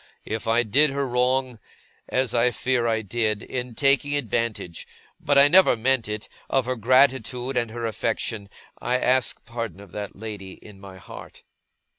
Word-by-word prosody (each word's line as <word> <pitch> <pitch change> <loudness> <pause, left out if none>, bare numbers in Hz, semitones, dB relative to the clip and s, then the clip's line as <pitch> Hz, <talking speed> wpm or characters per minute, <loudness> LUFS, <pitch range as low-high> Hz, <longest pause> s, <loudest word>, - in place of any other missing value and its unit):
If 110 +1 -4
I 115 +2 +3
did 140 +8 +3
her 140 0 -2
wrong; 125 0 0 0.5
as 130 -2 0
I 120 +1 +3
fear 125 0 0
I 110 -1 0
did, 110 0 -1
in 125 -2 -5
taking 140 +1 +2
advantage 115 - -3 0.3
(but 145 -1 +1
I 140 +1 +8
never 180 -5 +5
meant 130 0 +1
it) 105 0 -5 0.2
of 135 -2 +1
her 130 +1 -1
gratitude 130 +1 +2
and 120 -2 0
her 115 +1 -5
affection; 110 -2 -2 0.3
I 125 +1 0
ask 130 +1 0
pardon 115 -4 -5
of 100 -3 -13
that 105 +1 -6
lady, 100 -3 -7
in 100 -2 -15
my 95 -1 -11
heart! 90 - -12
120 Hz, 165 wpm, -24 LUFS, 110-130 Hz, 0.5 s, I